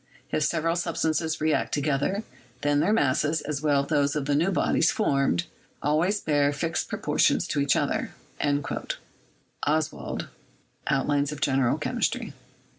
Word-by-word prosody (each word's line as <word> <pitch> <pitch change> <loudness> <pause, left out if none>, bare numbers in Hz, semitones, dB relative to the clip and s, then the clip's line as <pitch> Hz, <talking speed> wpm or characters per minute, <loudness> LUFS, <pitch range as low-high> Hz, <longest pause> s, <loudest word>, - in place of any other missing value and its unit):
If - - 0
several 165 +2 +1
substances 160 -2 -1
react 155 0 +1
together, 150 +8 0 0.4
then 145 0 +2
their 170 +7 +2
masses, 150 -4 +2
as 145 -2 -3
well 145 -2 +3
as - - -10
those 145 -1 +2
of 145 -2 -1
the 145 - +1
new 160 +6 +2
bodies 195 - +2
formed, 140 - +1 0.3
always 165 +8 +1
bear 145 -4 +2
fixed 160 +3 -2
proportions - - +1
to - - 0
each 140 0 +3
other." - - 0 1.5
(Ostwald, 155 +1 -1 0.6
"Outlines 140 +1 +1
of 150 - -6
General 135 -4 +2
Chemistry.") - - -1
150 Hz, 135 wpm, -26 LUFS, 140-160 Hz, 1.5 s, well